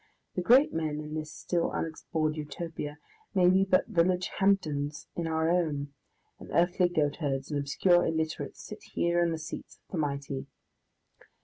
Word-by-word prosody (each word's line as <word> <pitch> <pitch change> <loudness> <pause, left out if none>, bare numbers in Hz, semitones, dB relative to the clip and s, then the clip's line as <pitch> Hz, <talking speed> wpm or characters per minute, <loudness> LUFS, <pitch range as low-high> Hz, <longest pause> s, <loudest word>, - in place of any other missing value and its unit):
The 180 - -1
great 255 +10 +6
men 155 -2 -1
in 150 0 -6
this 155 -1 -4
still 170 +2 -1
unexplored 160 -1 -2
Utopia 155 -1 -5 0.4
may 180 -1 +6
be 190 +1 +4
but 190 -1 +3
village 180 +1 +1
Hampdens 155 -7 +1
in 170 -1 -2
our 160 0 +1
own, 145 -5 0 0.5
and - - -11
earthly 175 +1 +3
goatherds 145 -3 -1
and 145 - 0
obscure 175 +5 +3
illiterates 160 -1 -2
sit - - -9
here 170 0 0
in 170 -1 +2
the 165 - -1
seats 155 +2 -7
of - - -35
the 175 - -2
mighty. 140 -2 -2
160 Hz, 155 wpm, -29 LUFS, 150-175 Hz, 0.5 s, great